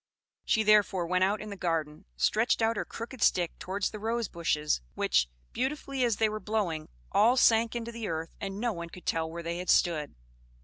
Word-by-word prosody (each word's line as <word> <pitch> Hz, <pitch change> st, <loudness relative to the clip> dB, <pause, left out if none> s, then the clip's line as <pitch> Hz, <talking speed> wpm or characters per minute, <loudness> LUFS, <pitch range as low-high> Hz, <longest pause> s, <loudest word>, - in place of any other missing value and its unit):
She 220 Hz, -, +2 dB
therefore 205 Hz, -4 st, +4 dB
went 185 Hz, +2 st, +2 dB
out 200 Hz, +2 st, +1 dB
in 215 Hz, -, -7 dB
the -, -, -5 dB
garden, 165 Hz, -5 st, -2 dB
stretched 225 Hz, -, +2 dB
out 225 Hz, +1 st, +2 dB
her -, -, -2 dB
crooked 235 Hz, +1 st, -8 dB
stick 175 Hz, -2 st, +2 dB
towards 195 Hz, +2 st, -2 dB
the 215 Hz, -, -7 dB
rose 230 Hz, +1 st, -1 dB
bushes, 150 Hz, -, 0 dB
which, -, -, +2 dB, 0.2 s
beautifully 270 Hz, 0 st, -2 dB
as 235 Hz, -3 st, +2 dB
they 220 Hz, -, +2 dB
were 215 Hz, 0 st, -3 dB
blowing, 195 Hz, -8 st, -2 dB, 0.2 s
all 235 Hz, +5 st, +4 dB
sank 230 Hz, -1 st, +4 dB
into 235 Hz, 0 st, -4 dB
the 230 Hz, -2 st, -5 dB
earth 165 Hz, 0 st, -4 dB
and 195 Hz, 0 st, -4 dB
no 235 Hz, 0 st, 0 dB
one 170 Hz, -2 st, -6 dB
could 180 Hz, -, -12 dB
tell 160 Hz, 0 st, 0 dB
where 170 Hz, +1 st, -6 dB
they 170 Hz, +1 st, -3 dB
had 180 Hz, -, -5 dB
stood. 155 Hz, -5 st, +2 dB
200 Hz, 205 wpm, -29 LUFS, 170-225 Hz, 0.2 s, therefore